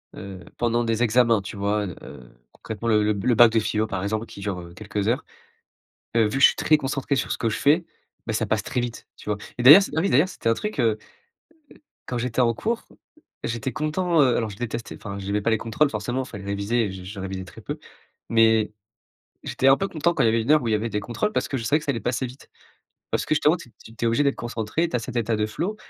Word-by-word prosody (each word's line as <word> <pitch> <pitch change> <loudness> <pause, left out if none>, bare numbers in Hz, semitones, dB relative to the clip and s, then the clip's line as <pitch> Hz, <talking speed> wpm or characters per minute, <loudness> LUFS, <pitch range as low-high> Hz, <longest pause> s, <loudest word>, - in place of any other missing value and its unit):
heu, 95 -1 -8 0.2
pendant 120 0 +1
des 115 +1 0
examens, 115 -2 +3
tu 100 +2 -8
vois? 105 +1 0 0.2
Heu, - - -12 0.2
concrètement, 110 +1 -6
le 105 -2 +4
le 105 0 +2
b 100 -2 -5
le 120 -2 +3
bac 120 0 +7
de 115 - +3
philo, 110 0 0
par 100 -3 -3
exemple, 110 +2 -2
qui 100 - -12
dure, 100 -2 -3
heu, 85 0 -12
quelques 100 +1 -4
heures. 120 - 0 0.9
Heu, 115 - +5
vu 105 +6 -1
que - - -3
je - - +10
suis - - +2
très 155 - +4
concentré 135 0 -1
sur - - -2
ce - - 0
que 115 - 0
je - - -3
fais, 160 +4 +3 0.4
ben, - - -1
ça - - 0
passe - - 0
très 125 - -2
vite, 120 -2 -5
tu - - -11
vois? 105 - +1 0.2
Et - - -1
d'ailleurs 150 +10 +10
c - - -5
ah - - +3
oui, 195 - +1
d'ailleurs, 145 +9 +4
c'était 115 - -3
un 115 - +4
truc, 210 - -5
heu 115 -2 +3
heu, 110 - -7 1.1
quand 125 - -3
j'étais 120 +1 -1
en 115 -1 +3
cours, 230 - -2 0.6
j'étais 120 +2 -3
content, 160 +2 +1
heu, 125 -4 +4
alors 110 -2 -1
je 100 - -9
détestais, 115 0 -5
enfin, 100 -1 -7
j'aimais 100 +1 -2
pas 115 - +1
les 110 - +2
contrôles, 115 +7 +1
forcément, 120 +4 -2
il - - -12
fallait 100 -3 -9
réviser 100 +4 0
et 95 - -5
je 95 -1 -9
je 95 +1 -7
révisais 95 -1 -5
très 90 - -13
peu, - - -5 0.5
mais 110 -2 +3 0.7
j'étais 130 - 0
un 135 0 +7
peu 195 - -1
content 170 +1 0
quand - - +1
il - - +4
y - - +5
avait 115 +1 +2
1 120 +6 +1
heure 155 -2 +5
où 120 - -3
il 110 - +1
y - - +3
avait 110 +2 -2
des 105 - -1
contrôles 120 - -2
parce - - 0
que 135 - -2
je 115 - -5
savais 145 +7 +2
que 150 - -11
ça 140 - +1
allait 115 - -3
passer 120 +4 -1
vite, 125 +2 -12 0.6
parce - - 0
que, - - +1
justement, 150 +3 +3
tu 160 - -13
es - - -25
tu 115 - -14
tu 115 - -2
es - - +4
obligé 115 +6 +2
d'être 140 - +1
concentré, 120 +8 -2
tu 125 - -3
as - - +1
cet 125 +2 -7
état 115 -1 +1
de 105 0 0
flow. 175 - -3
115 Hz, 280 wpm, -24 LUFS, 105-135 Hz, 1.1 s, je